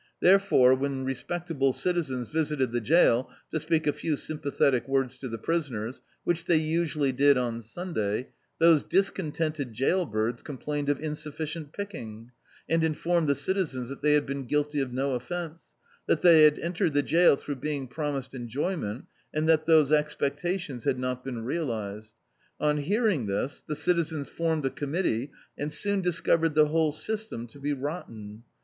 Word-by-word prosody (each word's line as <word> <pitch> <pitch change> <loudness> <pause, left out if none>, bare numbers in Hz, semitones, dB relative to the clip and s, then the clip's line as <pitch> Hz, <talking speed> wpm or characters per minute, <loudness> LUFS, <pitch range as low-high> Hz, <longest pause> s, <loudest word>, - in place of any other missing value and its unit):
Therefore, 185 -9 +5
when 135 0 -1
respectable 135 0 -1
citizens 140 -10 -1
visited 150 -5 0
the 120 0 -1
jail 130 -2 +4 0.2
to 160 - -1
speak 160 +1 0
a 150 - +2
few 155 -3 -2
sympathetic 140 -5 0
words 135 -1 0
to 130 - -5
the 115 - -4
prisoners, 130 -5 -2 0.2
which 175 -1 0
they 170 - +3
usu 160 0 0
ally 140 -3 +2
did 140 +1 +4
on 120 -2 -2
Sunday, 115 - -3 0.3
those 165 -2 +5
discontented 155 - -1
jail 165 - +1
birds 110 +2 -1
complained 145 0 -4
of 145 - +1
insufficient 155 0 -5
picking; 115 - -7 0.4
and 165 +1 +2
informed 160 0 +1
the 140 - +3
citizens 145 -11 -2
that 140 - -8
they 150 0 +4
had 150 -1 +3
been 140 0 -4
guilty 150 +2 0
of 130 -2 -3
no 135 +2 -1
offence; 165 +6 -6 0.3
that - - +2
they 165 -3 +8
had 150 0 +5
entered 170 -1 -1
the 145 0 +2
jail 165 0 +5
throu^ 140 -3 -6
being 145 -3 -3
promised 140 -1 -4
enjoyment, 130 - -3 0.3
and 155 +1 -1
that 160 -1 +3
those 155 -3 +5
expectaticns 150 -1 -1
had 130 - +1
not 125 0 -3
been 120 -4 -5
realised. 110 -8 -3 0.5
On 150 0 +2
hearing 185 - +1
this, 100 +8 -2
the 150 - -5
citizens 160 -4 0
formed 160 -3 -1
a 135 - 0
committee, 145 -4 -1 0.3
and 150 +1 -2
soon 200 +5 +1
discovered 165 -3 +1
the 155 -1 +5
whole 160 -1 +2
system 215 - -4
to 120 +4 -15
be 145 +1 -2
rotten. 115 -8 -6
150 Hz, 165 wpm, -27 LUFS, 130-165 Hz, 0.5 s, they